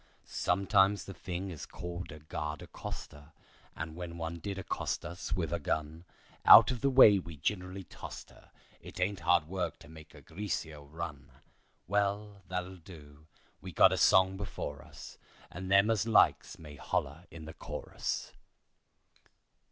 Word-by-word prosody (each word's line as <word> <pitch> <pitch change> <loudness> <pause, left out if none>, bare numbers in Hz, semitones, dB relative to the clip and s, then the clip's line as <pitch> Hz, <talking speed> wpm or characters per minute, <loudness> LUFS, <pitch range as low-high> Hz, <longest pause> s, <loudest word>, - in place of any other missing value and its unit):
Sometimes 100 +2 +2
the 95 - -8
thing 90 +1 -5
is 80 - -8
called 85 0 -7
a 75 - -9
guard 75 0 -5
accoster, 75 +1 -9 0.4
And 80 0 -6
when 85 -1 -7
one 85 +1 -4
did 100 +3 -5
accost 95 - -3
us 85 -1 -5
with 85 -3 -2
a 85 - -1
gun, 80 +2 -3 0.4
Out - - +10
of 125 - -4
the 140 - +3
way 120 -7 +8
we 85 -3 -9
ginerally 90 +5 -3
tost - - -9
her; - - -20 0.3
It - - -10
ain't 95 +1 0
hard 85 -2 +3
work 90 +1 -3
to - - -15
make 80 0 -14
a 70 - -13
greaser 80 -2 -5
run. 75 -1 -7 0.6
Well, 100 0 -1
that'll 90 0 -4
do. 80 -4 -14 0.3
We - - -8
got - - +6
a - - +2
song 95 0 +5
before 75 -7 -5
us, - - -12 0.3
And 95 +2 -6
them 100 +3 +5
as 110 0 0
likes 110 - +3
may 75 -2 -11
holler 75 +7 -3
in 80 -1 -10
the 80 - -8
chorus." - - -5
85 Hz, 160 wpm, -31 LUFS, 80-95 Hz, 0.6 s, Out